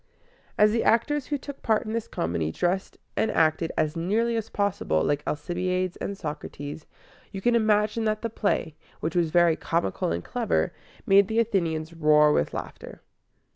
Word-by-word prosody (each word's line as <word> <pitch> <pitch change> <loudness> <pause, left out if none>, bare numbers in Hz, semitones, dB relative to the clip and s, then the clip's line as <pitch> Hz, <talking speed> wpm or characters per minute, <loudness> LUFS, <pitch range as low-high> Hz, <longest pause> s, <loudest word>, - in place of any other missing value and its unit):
As 210 0 +5
the 230 +1 +1
actors 280 +5 +2
who 290 - -1
took 280 0 -9
part 220 +1 +1
in 215 - -4
this 230 -1 -2
comedy 80 -2 -2
dressed 180 - -1 0.2
and 220 - +1
acted 160 +1 +2
as 155 +1 +1
nearly 215 +8 0
as 225 -1 -3
possible 195 - 0
like 145 0 0
Alcibiades 180 +4 -1
and 200 - -4
Socrates, 150 -2 -6 0.4
you 195 - -5
can 240 +5 +2
imagine 215 0 +2
that 215 0 -1
the 230 - -1
play, 200 -8 -1 0.2
which 160 +2 -3
was 170 -2 +2
very 175 0 +4
comical 165 - -1
and 85 +1 -2
clever, 80 -1 0 0.3
made 195 0 +5
the 220 - -2
Athenians 170 -8 0
roar 150 -2 +4
with 75 - +1
laughter. - - -8
180 Hz, 170 wpm, -26 LUFS, 155-215 Hz, 0.4 s, As